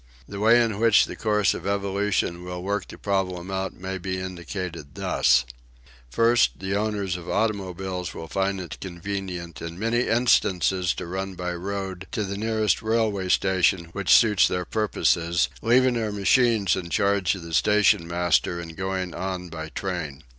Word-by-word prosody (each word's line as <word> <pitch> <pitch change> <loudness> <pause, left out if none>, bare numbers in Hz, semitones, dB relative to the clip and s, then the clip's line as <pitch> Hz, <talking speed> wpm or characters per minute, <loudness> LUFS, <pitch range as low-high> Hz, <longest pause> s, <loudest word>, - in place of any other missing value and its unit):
The 100 - -7
way 115 +3 +5
in 110 -3 -2
which 115 -2 +5
the - - -7
course 105 -2 +1
of - - -6
evolution 100 -3 -1
will 90 0 -6
work 100 0 -2
the - - -11
problem 95 -2 -2
out 95 0 -3
may 95 +1 -5
be 95 +1 -3
indicated 85 -4 -6
thus: 65 0 +2 0.6
First, 115 - +3
the 95 +1 -3
owners 100 -3 -1
of 90 0 -9
automobiles 95 -4 -2
will 80 - -8
find 95 +1 -1
it 85 -5 -7
convenient 90 -2 -5
in 85 0 -6
many 115 +4 0
instances 95 -6 +2
to - - -5
run 95 +2 -4
by 90 0 -3
road 95 +1 -5
to 110 - -1
the 100 0 -4
nearest 110 -1 0
railway 110 -4 0
station 95 -2 +2
which 100 +1 -4
suits 105 -4 +6
their 90 0 -2
purposes, 85 -5 +1
leaving 125 +3 +4
their 110 -3 -1
machines 105 0 +3
in 90 -2 -5
charge 100 0 +1
of 95 - -9
the 85 0 -8
stationmaster 90 -4 +2
and 80 -1 -8
going 95 -1 -3
on 90 0 -4
by 80 -1 -6
train. 80 -7 -5
95 Hz, 160 wpm, -25 LUFS, 90-105 Hz, 0.6 s, suits